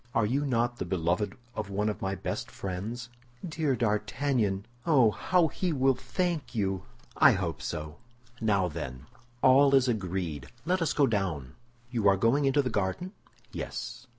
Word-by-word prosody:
Are 115 Hz, -, +3 dB
you 140 Hz, +6 st, 0 dB
not 120 Hz, -1 st, +1 dB
the 90 Hz, -, -3 dB
beloved 90 Hz, +4 st, -1 dB, 0.2 s
of 105 Hz, -3 st, -4 dB
one 100 Hz, +2 st, 0 dB
of 105 Hz, -, -2 dB
my 95 Hz, 0 st, -1 dB
best -, -, -4 dB
friends?" 105 Hz, +6 st, -5 dB, 0.4 s
"Dear 155 Hz, -4 st, 0 dB
D'Artagnan! 105 Hz, -1 st, 0 dB, 0.2 s
Oh, 130 Hz, -9 st, +5 dB
how 180 Hz, -, +2 dB
he 180 Hz, +3 st, -2 dB
will 135 Hz, -2 st, +3 dB
thank 150 Hz, +3 st, -2 dB
you!" 95 Hz, -4 st, -1 dB, 0.3 s
"I -, -, +7 dB
hope 85 Hz, -8 st, -2 dB
so. 75 Hz, +4 st, -5 dB, 0.4 s
Now, 100 Hz, -4 st, +2 dB
then, 70 Hz, -5 st, -6 dB, 0.4 s
all 135 Hz, +1 st, +6 dB
is 135 Hz, -1 st, +4 dB
agreed; 90 Hz, -, -2 dB, 0.2 s
let 180 Hz, +2 st, +1 dB
us 165 Hz, -, +1 dB
go 145 Hz, -, +4 dB
down." 90 Hz, -, -1 dB, 0.4 s
"You 115 Hz, -5 st, +1 dB
are 100 Hz, -1 st, +5 dB
going 125 Hz, +8 st, +3 dB
into 140 Hz, +1 st, +3 dB
the 125 Hz, -, -2 dB
garden?" 105 Hz, -, -1 dB, 0.4 s
"Yes." 125 Hz, +1 st, -6 dB
110 Hz, 160 wpm, -29 LUFS, 95-135 Hz, 0.4 s, I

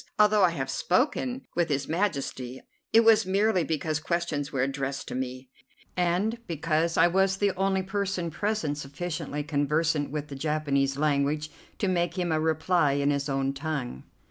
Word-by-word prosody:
Although 210 Hz, 0 st, +5 dB
I 180 Hz, -, +6 dB
have 135 Hz, -5 st, -3 dB
spoken 255 Hz, -, 0 dB
with 170 Hz, -1 st, +1 dB
His 140 Hz, -1 st, -1 dB
Majesty, 140 Hz, -8 st, -2 dB, 0.3 s
it 225 Hz, -, +7 dB
was 225 Hz, -4 st, +5 dB
merely 195 Hz, -1 st, +2 dB
because 155 Hz, -1 st, -1 dB
questions 160 Hz, -4 st, -2 dB
were 135 Hz, -2 st, 0 dB
addressed 135 Hz, 0 st, -3 dB
to -, -, -5 dB
me, 130 Hz, 0 st, -5 dB, 0.4 s
and 180 Hz, +6 st, +1 dB
because 165 Hz, 0 st, 0 dB
I -, -, +6 dB
was 190 Hz, +2 st, +2 dB
the 200 Hz, 0 st, +2 dB
only 190 Hz, 0 st, +1 dB
person 195 Hz, -3 st, -2 dB
present 170 Hz, -6 st, -1 dB
sufficiently 150 Hz, +1 st, -4 dB
conversant 150 Hz, +1 st, 0 dB
with 150 Hz, +1 st, -4 dB
the 140 Hz, -, -6 dB
Japanese 140 Hz, -2 st, 0 dB
language 150 Hz, +1 st, 0 dB, 0.3 s
to 200 Hz, -, 0 dB
make 175 Hz, 0 st, 0 dB
him 175 Hz, -2 st, 0 dB
a 155 Hz, -, +2 dB
reply 160 Hz, -1 st, +2 dB
in 140 Hz, +1 st, +2 dB
his 140 Hz, 0 st, -1 dB
own 135 Hz, 0 st, 0 dB
tongue." 140 Hz, -, -4 dB
155 Hz, 165 wpm, -27 LUFS, 140-185 Hz, 0.4 s, it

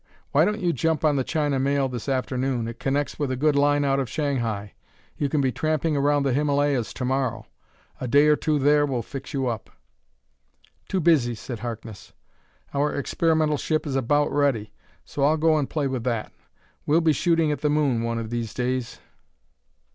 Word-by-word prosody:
Why -, -, +4 dB
don't 210 Hz, +1 st, -1 dB
you 175 Hz, -2 st, +1 dB
jump 160 Hz, +3 st, 0 dB
on 150 Hz, -2 st, +3 dB
the 135 Hz, -, +1 dB
China 145 Hz, -2 st, 0 dB
Mail 140 Hz, 0 st, +1 dB
this 125 Hz, +1 st, -5 dB
afternoon; 130 Hz, -2 st, -1 dB
it 115 Hz, 0 st, -7 dB
connects 140 Hz, +3 st, -1 dB
with 145 Hz, -3 st, -1 dB
a 130 Hz, -, -1 dB
good 145 Hz, +3 st, +2 dB
line 145 Hz, 0 st, +3 dB
out 135 Hz, 0 st, +2 dB
of 130 Hz, -4 st, -2 dB
Shanghai. 115 Hz, -9 st, -2 dB, 0.4 s
You 145 Hz, -, -1 dB
can 150 Hz, 0 st, +1 dB
be 130 Hz, -1 st, +1 dB
tramping 155 Hz, +3 st, 0 dB
around 145 Hz, 0 st, +2 dB
the 135 Hz, -2 st, +1 dB
Himalayas 145 Hz, -3 st, +1 dB
to 125 Hz, -, -3 dB
morrow. 130 Hz, -3 st, -1 dB, 0.5 s
A 130 Hz, -, -4 dB
day 145 Hz, +4 st, +5 dB
or 150 Hz, 0 st, +5 dB
two 155 Hz, 0 st, 0 dB
there 145 Hz, +1 st, +4 dB
will 125 Hz, -4 st, -2 dB
fix 135 Hz, +3 st, -8 dB
you 135 Hz, -2 st, -1 dB
up." 115 Hz, -3 st, -3 dB, 1.2 s
"Too 190 Hz, -, 0 dB
busy," 140 Hz, -8 st, +3 dB
said 115 Hz, +1 st, -7 dB
Harkness. 115 Hz, -3 st, -7 dB, 0.6 s
"Our 145 Hz, +1 st, +1 dB
experimental 155 Hz, +1 st, +1 dB
ship 155 Hz, +2 st, -1 dB
is 140 Hz, -3 st, -3 dB
about 145 Hz, +3 st, +1 dB
ready, 135 Hz, -7 st, 0 dB, 0.3 s
so 140 Hz, -, -3 dB
I'll 155 Hz, +3 st, +4 dB
go 160 Hz, 0 st, +3 dB
and 140 Hz, -, -2 dB
play 150 Hz, -3 st, -1 dB
with 130 Hz, -3 st, -2 dB
that. 115 Hz, -4 st, -2 dB, 0.6 s
We'll 160 Hz, +3 st, +4 dB
be 160 Hz, -2 st, +3 dB
shooting 165 Hz, +1 st, +2 dB
at 145 Hz, -, -3 dB
the 150 Hz, -, +1 dB
moon 145 Hz, -6 st, +1 dB
one 115 Hz, 0 st, -2 dB
of 115 Hz, -1 st, -5 dB
these 115 Hz, -2 st, -3 dB
days." 125 Hz, -1 st, -2 dB
140 Hz, 195 wpm, -24 LUFS, 125-150 Hz, 1.2 s, day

